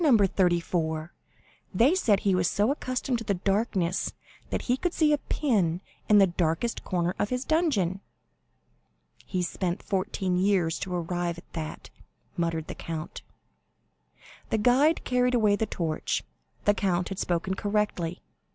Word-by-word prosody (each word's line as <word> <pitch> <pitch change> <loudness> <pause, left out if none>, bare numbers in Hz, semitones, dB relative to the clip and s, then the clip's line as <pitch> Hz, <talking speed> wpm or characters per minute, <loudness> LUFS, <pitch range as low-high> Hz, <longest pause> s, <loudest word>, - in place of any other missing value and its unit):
34. 175 - +2 0.6
They 245 - +5
said 220 - +2
he 195 - +2
was 180 -1 +2
so 210 +5 +2
accustomed 255 -3 -2
to 200 - +2
darkness 195 -2 0 0.4
that - - -2
he 250 - +2
could 350 +6 -2
see 305 -2 +4
a 295 - +2
pin 195 - 0 0.3
in 210 - +7
the 195 - +8
darkest 175 +5 -1
corner 175 -1 0
of 205 - 0
his 250 +1 -2
dungeon." 225 - +1 1.3
"He 185 -2 -1
spent 175 +1 -2
fourteen 190 -2 -1
years 185 -4 +2
to 180 -1 -3
arrive 175 0 -2
at 175 - -15
that," 155 -2 -6 0.4
muttered 165 -2 -1
the - - -6
count. 165 0 -6 1.3
The - - +1
guide 260 +9 +3
carried 250 0 +2
away 210 -3 +4
the 220 +1 -1
torch. 160 -5 -2 0.4
The 205 - +5
count 180 -4 0
had 195 - -5
spoken 175 +2 -1
correctly. 200 -4 -1
190 Hz, 140 wpm, -27 LUFS, 175-230 Hz, 1.3 s, the